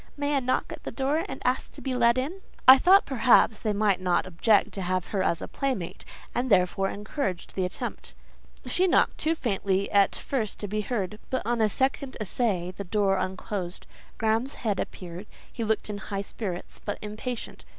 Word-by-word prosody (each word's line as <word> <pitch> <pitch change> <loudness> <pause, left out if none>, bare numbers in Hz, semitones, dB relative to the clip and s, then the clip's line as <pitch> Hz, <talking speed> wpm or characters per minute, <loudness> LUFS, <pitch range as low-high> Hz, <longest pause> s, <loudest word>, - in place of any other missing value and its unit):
May 285 0 0
I - - +4
knock 255 0 -1
at - - -9
the - - -5
door, 285 +4 0
and - - -7
ask 250 +1 0
to - - -10
be 265 - -3
let 235 -1 +4
in?" 310 +10 -3 0.3
I 260 +1 +11
thought 380 +5 +6
perhaps 240 -4 +4
they 215 - -1
might 200 -2 +2
not 180 -1 +2
object 190 +4 +3
to 195 - -5
have 185 0 -1
her 195 - 0
as 170 - +1
a - - -5
playmate, 255 -11 -3 0.3
and 255 +1 -1
therefore 195 0 +3
encouraged 205 - -4
the 185 - 0
attempt. 180 - -6 0.5
She 370 +1 +2
knocked—too 325 -2 +2
faintly 200 -7 0
at 200 -1 +4
first 230 -7 -2
to 205 - -3
be 210 +2 -1
heard, 210 -2 -3
but 260 - -2
on 235 0 +1
a 215 - +4
second 265 +3 -1
essay 195 -4 -1
the 200 - -5
door 195 0 +1
unclosed; 185 -1 -4 0.3
Graham's 225 +5 +1
head 210 -5 -1
appeared; 180 +2 -6 0.3
he 235 - -3
looked 220 0 0
in 205 -1 -4
high 200 -1 -4
spirits, 190 -4 -6
but 205 - -3
impatient. 220 +3 -6
215 Hz, 190 wpm, -27 LUFS, 195-255 Hz, 0.5 s, I